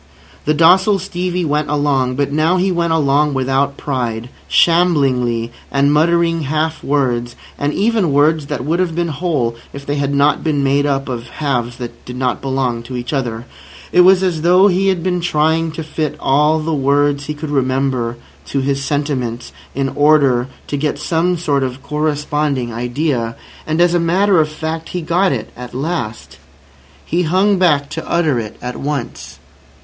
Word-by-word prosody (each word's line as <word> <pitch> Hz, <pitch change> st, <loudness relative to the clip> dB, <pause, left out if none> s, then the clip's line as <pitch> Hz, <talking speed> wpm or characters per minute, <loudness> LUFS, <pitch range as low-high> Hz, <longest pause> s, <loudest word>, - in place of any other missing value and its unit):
The 155 Hz, -, +2 dB
docile 185 Hz, +6 st, +5 dB
Stevie 180 Hz, -1 st, -3 dB
went 150 Hz, 0 st, 0 dB
along; 140 Hz, -4 st, +1 dB
but 140 Hz, +1 st, -1 dB
now 155 Hz, +5 st, +2 dB
he 185 Hz, +1 st, +1 dB
went 170 Hz, -1 st, 0 dB
along 145 Hz, -2 st, +2 dB
without 135 Hz, +1 st, 0 dB
pride, 120 Hz, -4 st, -3 dB, 0.2 s
shamblingly, 135 Hz, -9 st, +2 dB, 0.2 s
and 140 Hz, +1 st, +3 dB
muttering 165 Hz, +1 st, +2 dB
half 155 Hz, +3 st, -1 dB
words, 120 Hz, -4 st, 0 dB, 0.2 s
and 145 Hz, +1 st, -1 dB
even 210 Hz, -3 st, +1 dB
words 150 Hz, +1 st, +2 dB
that 135 Hz, -4 st, -4 dB
would 165 Hz, +4 st, 0 dB
have 175 Hz, -3 st, 0 dB
been 170 Hz, 0 st, -1 dB
whole 145 Hz, -7 st, -1 dB, 0.2 s
if 140 Hz, 0 st, -8 dB
they 145 Hz, +1 st, -2 dB
had 140 Hz, 0 st, -1 dB
not 140 Hz, +1 st, +2 dB
been 150 Hz, -3 st, 0 dB
made 140 Hz, +1 st, +2 dB
up 135 Hz, -1 st, -1 dB
of 120 Hz, -2 st, -5 dB
halves 120 Hz, -4 st, -2 dB
that 120 Hz, -2 st, -8 dB
did 125 Hz, -, -8 dB
not 125 Hz, -1 st, -1 dB
belong 130 Hz, -3 st, -1 dB
to 125 Hz, +2 st, -7 dB
each 120 Hz, +4 st, -5 dB
other. 120 Hz, -4 st, -2 dB, 0.5 s
It 180 Hz, -, +5 dB
was 185 Hz, +1 st, +5 dB
as 175 Hz, -4 st, 0 dB
though 180 Hz, +4 st, +5 dB
he 190 Hz, +1 st, +1 dB
had 185 Hz, -3 st, +1 dB
been 180 Hz, -1 st, 0 dB
trying 160 Hz, 0 st, +1 dB
to 160 Hz, -, -5 dB
fit 155 Hz, -1 st, -3 dB
all 150 Hz, +3 st, +3 dB
the 160 Hz, +1 st, -2 dB
words 140 Hz, 0 st, +1 dB
he 150 Hz, -, -3 dB
could 150 Hz, 0 st, -6 dB
remember 130 Hz, -3 st, 0 dB, 0.3 s
to 140 Hz, -, -1 dB
his 140 Hz, +1 st, -1 dB
sentiments 135 Hz, -5 st, -2 dB, 0.2 s
in 135 Hz, 0 st, 0 dB
order 140 Hz, -5 st, +3 dB, 0.2 s
to 145 Hz, -, -3 dB
get 150 Hz, 0 st, -1 dB
some 170 Hz, +4 st, 0 dB
sort 145 Hz, -4 st, 0 dB
of 130 Hz, +1 st, -4 dB
corresponding 150 Hz, -4 st, -1 dB
idea. 120 Hz, 0 st, -2 dB, 0.3 s
And, 155 Hz, +1 st, -1 dB
as 175 Hz, 0 st, +4 dB
a 175 Hz, -, +3 dB
matter 185 Hz, +3 st, +3 dB
of 155 Hz, -, -1 dB
fact, 160 Hz, +1 st, -5 dB
he 180 Hz, -2 st, -4 dB
got 180 Hz, +4 st, +2 dB
it 115 Hz, -5 st, -4 dB
at 125 Hz, 0 st, -9 dB
last. 115 Hz, -, -4 dB, 0.7 s
He 175 Hz, -, 0 dB
hung 190 Hz, +4 st, +2 dB
back 150 Hz, -6 st, +3 dB
to -, -, -6 dB
utter 160 Hz, -7 st, +1 dB
it 110 Hz, -2 st, -7 dB
at 125 Hz, 0 st, -4 dB
once. 140 Hz, -3 st, -5 dB
145 Hz, 175 wpm, -17 LUFS, 130-165 Hz, 0.7 s, docile